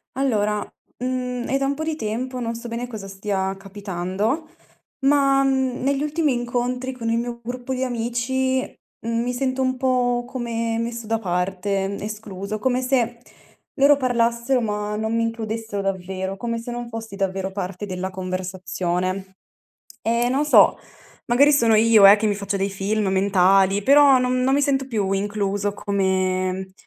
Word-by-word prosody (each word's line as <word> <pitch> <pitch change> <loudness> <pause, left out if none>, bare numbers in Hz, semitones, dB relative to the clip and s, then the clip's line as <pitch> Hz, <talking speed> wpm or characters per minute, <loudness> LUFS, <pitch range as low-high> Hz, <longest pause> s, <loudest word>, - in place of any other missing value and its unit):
Allora, 210 -6 +1 0.4
mhmm, 250 -1 -2
è 270 - +1
da 275 - 0
un 280 - 0
po' 310 - -4
di 315 -1 -2
tempo, 250 +1 -3
non 230 -1 -3
so 235 +1 -7
bene 235 +1 -4
cosa 215 -5 -7
stia 195 -1 -2
capitando, 200 - -3 0.5
ma, 275 0 +4
mhmm, 265 -2 0
negli 275 +1 +1
ultimi 300 -1 +1
incontri 245 +1 -2
con 235 -3 -4
il 230 - +1
mio 235 0 -4
gruppo 245 +2 -4
di 255 0 -1
amici, 255 +2 0 0.4
mhmm, 230 0 0
mi 245 +1 -2
sento 260 +1 -1
un 260 0 0
po' 245 -2 +1
come 230 -3 -2
messo 230 -1 -4
da 225 +1 +1
parte, 195 0 -1
escluso, 210 -1 -5
come 255 +3 +1
se, 250 -2 0 0.6
loro 285 +1 +7
parlassero 240 0 +1
ma 210 -1 -2
non 220 +1 -1
mi 230 - +1
includessero 225 -2 -3
davvero, 190 0 -3
come 230 +1 -3
se 230 - -8
non 240 0 -5
fossi 225 -2 -7
davvero 195 -1 -2
parte 190 0 -5
della 185 0 -3
conversazione. 185 0 -3 0.6
Eh, 235 +2 +1
non 275 +4 +1
so, 300 - +6 0.5
magari 275 +5 +5
sono 230 -6 +4
io, 220 -1 +6
eh, 200 +2 +8
che 215 +1 0
mi 205 - +1
faccio 200 0 -3
dei 195 +1 0
film 200 +2 -1
mentali, 195 0 +3
però 280 0 +7
no 250 - +1
non 255 +1 +2
mi 285 - +3
sento 270 -1 +1
più 210 -6 -1
incluso 200 0 -1
come 190 -1 -1
230 Hz, 165 wpm, -22 LUFS, 195-255 Hz, 0.6 s, eh